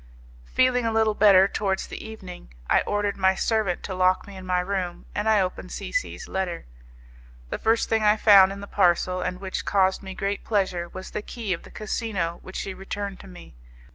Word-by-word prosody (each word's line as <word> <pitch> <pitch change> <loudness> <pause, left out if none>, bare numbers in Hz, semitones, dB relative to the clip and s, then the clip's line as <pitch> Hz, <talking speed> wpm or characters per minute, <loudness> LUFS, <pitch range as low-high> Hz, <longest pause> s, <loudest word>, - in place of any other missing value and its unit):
Feeling 255 -1 +2
a 230 - 0
little 220 -1 +2
better 195 -2 +6
towards 195 -1 -1
the - - -8
evening, 190 - -10 0.2
I - - +4
ordered 205 -1 -1
my 190 0 +3
servant 215 -4 0
to 190 - -4
lock 185 0 +2
me 200 - -11
in 185 -1 -9
my 180 0 +2
room, 180 -1 -3
and 210 +2 0
I 215 -1 +5
opened 185 -1 -3
C - - -6
C - - -2
's - - -9
letter. 185 -3 -3 0.9
The - - -3
first 225 +1 +2
thing 225 -1 +1
I 210 0 +4
found 195 -3 +7
in 200 0 -7
the - - -6
parcel, 185 -2 +2
and 180 - -3
which 190 -1 -4
caused 190 -1 +2
me 190 -1 -8
great 200 +1 -2
pleasure, 185 -5 -1
was 185 +1 -9
the - - -3
key 215 -2 -4
of 165 - -5
the - - -14
casino 205 -6 -3
which 185 - -11
she 195 - -4
returned 195 +1 -5
to - - -12
me. 180 - -13
195 Hz, 210 wpm, -25 LUFS, 185-210 Hz, 0.9 s, found